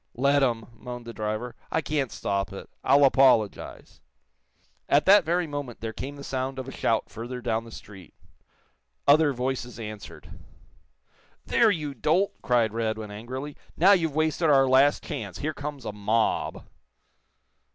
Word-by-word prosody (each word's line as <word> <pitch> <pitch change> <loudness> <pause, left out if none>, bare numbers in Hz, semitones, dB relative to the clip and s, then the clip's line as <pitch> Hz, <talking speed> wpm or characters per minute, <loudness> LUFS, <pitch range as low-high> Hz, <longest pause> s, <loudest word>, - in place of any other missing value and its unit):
"Let 140 +3 +3
'em," 115 -4 0
moaned 125 +1 -8
the 115 - -8
driver. 110 +3 -4 0.2
"I 160 - +1
can't 145 -5 -2
stop 100 0 -2
it. 100 - -9 0.2
I'll 140 +2 +5
apologize." 130 -6 +2 0.9
At 145 - +4
that 200 0 +7
very 175 +2 +1
moment 145 -5 -6
there 110 0 -5
came 135 +5 -6
the 140 - -10
sound 130 0 -3
of 130 0 -5
a - - -6
shout 115 -4 0
further 120 +3 -6
down 115 -2 -2
the 115 - -12
street. 95 -7 -12 0.9
Other 145 +1 +5
voices 125 -1 -4
answered. 105 -2 -9 1.1
"There, 230 - +4
you 150 -7 -2
dolt!" 160 - +1
cried 115 -3 +1
Radwin, 110 -2 -3
angrily. 130 +7 -7 0.2
"Now, 185 +5 +6
you've 165 -7 +2
wasted 155 +1 +1
our 135 -2 +5
last 135 +2 +4
chance. 145 -5 -6
Here 155 +2 -3
comes 145 -3 -7
a - - -3
mob!" 105 +2 -1
130 Hz, 150 wpm, -26 LUFS, 115-145 Hz, 1.1 s, that